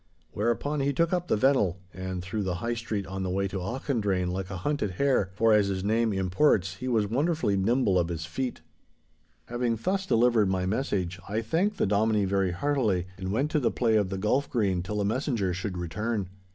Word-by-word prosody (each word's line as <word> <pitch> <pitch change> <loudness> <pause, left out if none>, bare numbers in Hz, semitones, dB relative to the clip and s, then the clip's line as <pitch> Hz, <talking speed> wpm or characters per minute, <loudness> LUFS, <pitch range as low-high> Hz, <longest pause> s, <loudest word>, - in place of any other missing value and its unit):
Whereupon 120 +7 -1
he 140 +1 +1
took 165 +6 +1
up 175 -1 0
the - - +2
Vennel 105 -7 +2 0.2
and 95 0 -5
through 105 +3 -3
the 95 -3 -1
High 115 +7 -2
Street 110 -4 -3
on 95 +1 -5
the 95 - -2
way 100 +2 0
to 95 - -5
Auchendrayne 100 -4 -1
like 95 +1 -4
a 95 - -5
hunted 105 0 -1
hare, 130 -3 +2
for, 115 +1 +4
as 105 -2 +4
his 95 -1 -2
name 110 +2 +2
imports, 95 0 +2
he 125 - -5
was 115 -4 +2
wonderfully 140 -1 +1
nimble 100 -1 +2
of 85 - +1
his 85 -1 -4
feet. 125 +9 -4 0.8
Having 120 -1 -1
thus 190 0 0
delivered 115 - +3
my 95 -1 0
message, 95 -4 -1
I 110 +3 -1
thanked 185 - 0
the - - +2
Dominie 105 +1 +2
very 95 -1 +1
heartily, 105 -2 0
and 95 0 -4
went 135 +8 0
to 155 - +2
the 125 - +2
play 115 -3 +1
of 105 -3 +2
the 95 - -3
golf 130 +8 +1
green 100 -7 +1
till 105 +4 -4
the 100 - 0
messenger 110 -4 0
should 90 +1 -4
return. 100 +3 -2
105 Hz, 205 wpm, -27 LUFS, 95-125 Hz, 0.8 s, for